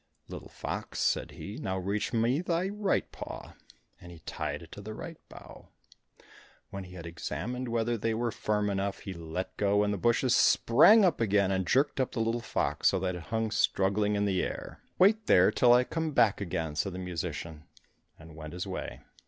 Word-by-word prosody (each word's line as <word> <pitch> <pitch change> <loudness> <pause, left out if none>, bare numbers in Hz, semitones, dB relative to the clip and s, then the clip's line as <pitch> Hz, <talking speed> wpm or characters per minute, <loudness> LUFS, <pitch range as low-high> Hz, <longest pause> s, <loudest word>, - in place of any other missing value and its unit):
"Little - - -9
fox," - - -6
said - - +1
he, 100 +3 -8
"now 95 -1 -2
reach 100 +3 -2
me 120 +6 +1
thy 180 +1 -1
right 205 -1 -1
paw" - - -8 0.5
and 85 - -11
he 85 - -11
tied 75 +1 -4
it 85 - -15
to 100 - -9
the 110 +1 -7
right 165 +7 -8
bough. - - -13 1.0
When 95 -1 -6
he 90 0 -12
had 85 -2 -8
examined 100 - -4
whether 115 0 -1
they 115 +1 0
were 120 +1 -1
firm 105 -1 -1
enough, 100 0 -2
he 95 - -6
let 85 +1 -5
go, 100 0 +2
and 105 0 0
the 100 - -3
bushes 120 +4 +2
sprang 195 - +6
up 170 -9 +1
again, 100 -3 +2
and 95 -2 -1
jerked 135 +6 +2
up 130 - 0
the 120 - -3
little 115 +1 0
fox, - - 0
so 95 - +3
that 95 0 -1
it 90 - -6
hung 110 -1 -2
struggling 105 0 +1
in 105 0 +1
the 95 -2 +1
air. - - -5 0.2
"Wait 210 +3 +4
there 95 +3 +6
till 120 +2 +4
I 125 +1 +6
come 160 +3 -3
back 110 -6 +3
again," 80 -5 -3
said 95 +4 -1
the - - -6
musician, 85 -3 -5 0.5
and 80 0 -14
went 75 0 -8
his 90 - -4
way. - - -6
105 Hz, 200 wpm, -29 LUFS, 90-120 Hz, 1.0 s, sprang